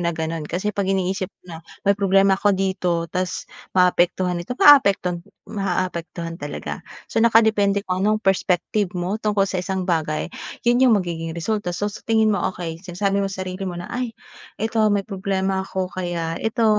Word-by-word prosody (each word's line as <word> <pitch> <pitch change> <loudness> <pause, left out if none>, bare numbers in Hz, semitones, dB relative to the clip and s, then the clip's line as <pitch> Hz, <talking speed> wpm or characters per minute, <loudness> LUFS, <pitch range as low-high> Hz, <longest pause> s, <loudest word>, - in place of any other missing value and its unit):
na 170 - 0
gano'n. 160 0 -3
Kasi 190 +5 -2
'pag 195 -1 -1
iniisip 190 0 0 0.2
mo 175 -2 -9
na - - -6 0.3
may 200 - +5
problema 195 -1 +3
ako 200 0 +2
dito 185 -3 0
ta's 180 0 -2 0.3
maaapektuhan 180 0 +3
ito, 245 +9 -5
maaapektuhan 200 -11 +6 0.3
maaapektuhan 175 -3 -3
talaga. 145 0 -5 0.3
So, 225 - +2
nakadepende 215 -3 +4
kung 185 +1 -1
anong 215 +1 +2
perspective 195 +1 +1
mo 180 +4 -1
tungkol 210 -2 +2
sa 185 - -1
isang 190 0 -2
bagay, 160 -3 -1 0.4
yun 240 +1 +4
yung 230 -4 +6
magiging 165 -3 -3
resulta. 205 +1 -2
So, 205 +3 -1
sa - - -9
tingin 220 -1 +3
mo, 205 - +1 0.2
okey, 165 -2 -6
sinasabi 195 +2 0
mo 195 - 0
sarili 185 0 -5
mo 175 - -5
na, 175 - -7
"Ay, 245 -2 -3 0.4
ito 225 +1 0
may 200 -1 +1
problema 190 -1 -1
ako 190 -1 -3
kaya 170 -3 -3
ito 225 +1 0
190 Hz, 170 wpm, -22 LUFS, 175-205 Hz, 0.4 s, maaapektuhan